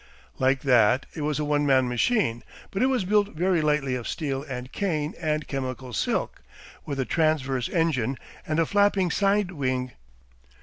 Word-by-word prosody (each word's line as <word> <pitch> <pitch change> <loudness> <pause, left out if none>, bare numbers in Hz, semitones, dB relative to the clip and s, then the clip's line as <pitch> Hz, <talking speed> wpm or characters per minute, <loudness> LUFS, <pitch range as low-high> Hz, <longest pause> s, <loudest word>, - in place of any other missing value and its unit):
Like 130 0 +2
that, 125 -1 +4
it 155 - -6
was 150 0 -1
a 150 - -1
one 145 0 +1
man 130 -3 +3
machine, 125 - +1 0.3
but 195 - -2
it 255 - +4
was 255 -7 0
built 205 -1 +1
very 175 +1 +2
lightly 150 -3 +1
of 125 -2 -3
steel 140 -5 -2
and 125 0 -6
cane 155 -7 -1
and 155 -1 -1
chemical 130 -2 -4
silk, - - -1 0.5
with 140 -2 -3
a 130 - 0
transverse 135 -6 0
engine, 135 -7 0 0.3
and 155 +1 0
a 165 - +3
flapping 200 -1 +2
sidewing. 165 -11 0
150 Hz, 165 wpm, -26 LUFS, 130-175 Hz, 0.5 s, that